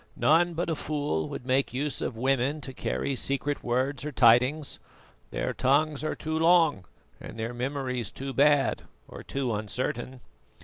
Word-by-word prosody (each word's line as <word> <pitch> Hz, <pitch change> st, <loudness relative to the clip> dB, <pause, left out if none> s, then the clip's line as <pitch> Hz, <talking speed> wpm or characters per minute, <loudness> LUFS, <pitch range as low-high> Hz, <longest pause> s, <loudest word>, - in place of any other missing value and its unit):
"None 170 Hz, +2 st, +3 dB
but 170 Hz, -, -1 dB
a -, -, 0 dB
fool 145 Hz, -, -2 dB
would 125 Hz, -, -7 dB
make 130 Hz, 0 st, +1 dB
use 145 Hz, +1 st, -2 dB
of 115 Hz, -, -3 dB
women 135 Hz, +4 st, +1 dB
to 135 Hz, -2 st, -7 dB
carry 135 Hz, +1 st, -2 dB
secret 140 Hz, +2 st, -1 dB
words 130 Hz, +3 st, -1 dB
or 150 Hz, -, -4 dB
tidings. 125 Hz, +4 st, +3 dB, 0.5 s
Their -, -, -2 dB
tongues 145 Hz, +3 st, +1 dB
are 155 Hz, -, -2 dB
too 160 Hz, 0 st, -3 dB
long 165 Hz, -, +4 dB, 0.3 s
and -, -, -9 dB
their 115 Hz, +2 st, -3 dB
memories 125 Hz, -3 st, -3 dB
too 135 Hz, 0 st, -6 dB
bad, 145 Hz, 0 st, +3 dB, 0.3 s
or -, -, -10 dB
too 135 Hz, -4 st, -2 dB
uncertain." 120 Hz, +4 st, -3 dB
135 Hz, 160 wpm, -27 LUFS, 125-150 Hz, 0.5 s, long